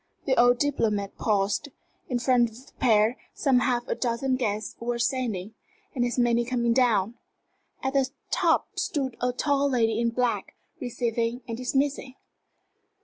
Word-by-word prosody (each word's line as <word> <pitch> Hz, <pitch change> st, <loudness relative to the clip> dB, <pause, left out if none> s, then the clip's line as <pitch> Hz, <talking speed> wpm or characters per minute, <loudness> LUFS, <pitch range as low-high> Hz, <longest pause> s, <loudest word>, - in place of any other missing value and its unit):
The 265 Hz, -, +2 dB
old 245 Hz, +1 st, +5 dB
diplomat 220 Hz, -8 st, 0 dB
paused. 205 Hz, +6 st, 0 dB, 0.4 s
In 250 Hz, -, +1 dB
front 240 Hz, -1 st, +3 dB
of 235 Hz, +4 st, -15 dB
the -, -, -21 dB
pair 225 Hz, 0 st, +3 dB, 0.2 s
some 265 Hz, -3 st, +3 dB
half 245 Hz, -1 st, 0 dB
a -, -, 0 dB
dozen 255 Hz, +2 st, 0 dB
guests 215 Hz, -4 st, -2 dB
were 240 Hz, +1 st, -2 dB
ascending, 235 Hz, -5 st, -1 dB, 0.4 s
and 245 Hz, -, 0 dB
as 245 Hz, +1 st, -1 dB
many 240 Hz, -1 st, +3 dB
coming 235 Hz, -1 st, +1 dB
down. 230 Hz, -3 st, +2 dB, 0.6 s
At 265 Hz, 0 st, -1 dB
the 270 Hz, -1 st, +2 dB, 0.2 s
top -, -, +1 dB
stood 265 Hz, -6 st, -2 dB
a 250 Hz, 0 st, +1 dB
tall 280 Hz, +2 st, +1 dB
lady 225 Hz, -4 st, +1 dB
in 235 Hz, 0 st, +2 dB
black, 240 Hz, 0 st, -1 dB, 0.2 s
receiving 235 Hz, -2 st, -2 dB
and 230 Hz, -, -3 dB
dismissing. 265 Hz, +1 st, -1 dB
245 Hz, 150 wpm, -26 LUFS, 230-260 Hz, 0.6 s, old